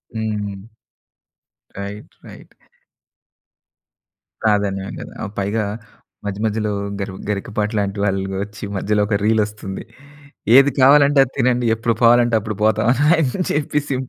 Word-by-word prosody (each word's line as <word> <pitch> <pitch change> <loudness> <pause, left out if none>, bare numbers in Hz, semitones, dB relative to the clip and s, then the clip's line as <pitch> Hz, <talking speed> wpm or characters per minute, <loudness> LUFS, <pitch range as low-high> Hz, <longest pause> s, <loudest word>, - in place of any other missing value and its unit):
హ్మ్. 105 -2 -4 1.1
Right 100 +1 -7
right. - - -14 1.9
ప్రాధాన్యమే 100 -2 0
గదా! - - -9
ఆహ్, 100 - -5
పైగా 105 +3 -1 0.6
మధ్య 100 0 -4
మధ్యలో 105 -1 -1 0.3
గరివ్ 95 -1 -5
గరికపాటి 105 +1 -2
లాంటి 100 0 -2
వాళ్ళు 95 -1 -1
ఒచ్చి 105 +1 -11
మధ్యలో 105 +2 0
ఒక 100 -1 +1
రీల్ 110 0 +3
ఒస్తుంది. 105 -2 -7 0.7
"ఏది 140 +1 +7
కావాలంటే 140 +1 +6
అది 125 - -13
తినండి. 125 0 +2
ఎప్పుడు 115 +1 0
పోవాలంటే 120 0 +5
అప్పుడు 110 -1 -5
పోతాం" 110 0 +2 0.3
అని 160 +4 -1
చెప్పేసి. 145 -1 -1
105 Hz, 120 wpm, -20 LUFS, 100-120 Hz, 1.9 s, ఏది